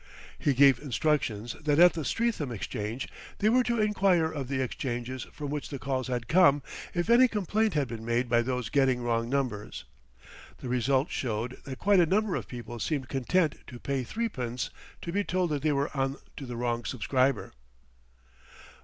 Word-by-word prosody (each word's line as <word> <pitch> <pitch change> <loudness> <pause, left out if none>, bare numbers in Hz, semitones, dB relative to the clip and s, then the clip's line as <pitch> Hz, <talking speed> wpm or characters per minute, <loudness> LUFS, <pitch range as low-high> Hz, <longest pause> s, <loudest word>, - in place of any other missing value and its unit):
He 140 - +1
gave 135 -2 +6
instructions 125 -5 -1
that 150 -2 +1
at 175 +1 +8
the 160 - -3
Streatham 220 - -1
Exchange 110 +2 -4 0.3
they 210 - +3
were 250 +3 +5
to 235 -1 0
enquire 195 -6 +3
of 140 -5 -4
the 135 0 -2
exchanges 125 -1 -3
from 145 -1 -6
which 150 -1 -4
the 140 - -4
calls 130 -1 -2
had 120 -2 -3
come 145 -5 +5 0.3
if 175 +1 0
any 240 +2 +7
complaint 215 -1 0
had 145 -3 +1
been 115 -1 -7
made 120 +2 0
by 120 0 +3
those 125 -2 -2
getting 130 -3 +2
wrong 115 -1 0
numbers. 125 -7 -2 0.7
The 125 - -7
result 130 +3 +1
showed 120 0 -3
that 135 -2 -6
quite 200 -1 +4
a 170 - +5
number 205 +2 +1
of - - -4
people 120 -1 -7
seemed 135 0 -2
content 150 +5 +1
to 120 - -9
pay 135 0 -2
threepence 125 - -3 0.3
to 170 - -4
be 200 +3 +1
told 180 -3 0
that 145 -2 -1
they 155 +1 +2
were 140 +1 -1
on 135 +1 0 0.2
to 135 - -7
the 120 - -5
wrong 120 0 -1
subscriber. 130 +4 0
135 Hz, 180 wpm, -29 LUFS, 120-165 Hz, 0.7 s, at